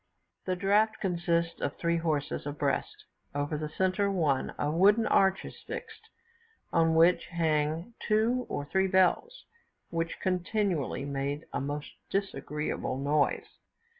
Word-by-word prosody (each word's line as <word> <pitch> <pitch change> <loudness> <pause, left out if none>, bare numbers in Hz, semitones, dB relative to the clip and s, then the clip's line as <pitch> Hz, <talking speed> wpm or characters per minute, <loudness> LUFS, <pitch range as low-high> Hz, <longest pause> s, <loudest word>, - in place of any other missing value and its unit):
The 185 - 0
draught 205 +4 +2
consists 170 -3 0
of 140 - -2
three 170 0 +1
horses 155 -3 -2
abreast; 145 -1 -2 0.3
over 145 +2 -1
the 150 0 -3
centre 190 +4 +1
one 155 -9 +1
a 145 - 0
wooden 205 +7 +4
arch 195 -2 +3
is - - -10
fixed, - - -8 0.6
on 165 -1 +3
which 170 +2 +4
hang 160 +3 0
two 230 +4 +1
or 145 - -3
three 190 +5 +1
bells, 190 - +2 0.5
which 165 0 -2
continually 180 - -1
made 140 +2 -3
a 140 - -1
most 145 +2 -4 0.2
disagreeable 150 -8 -2
noise. 145 +2 0
170 Hz, 130 wpm, -29 LUFS, 150-190 Hz, 0.6 s, wooden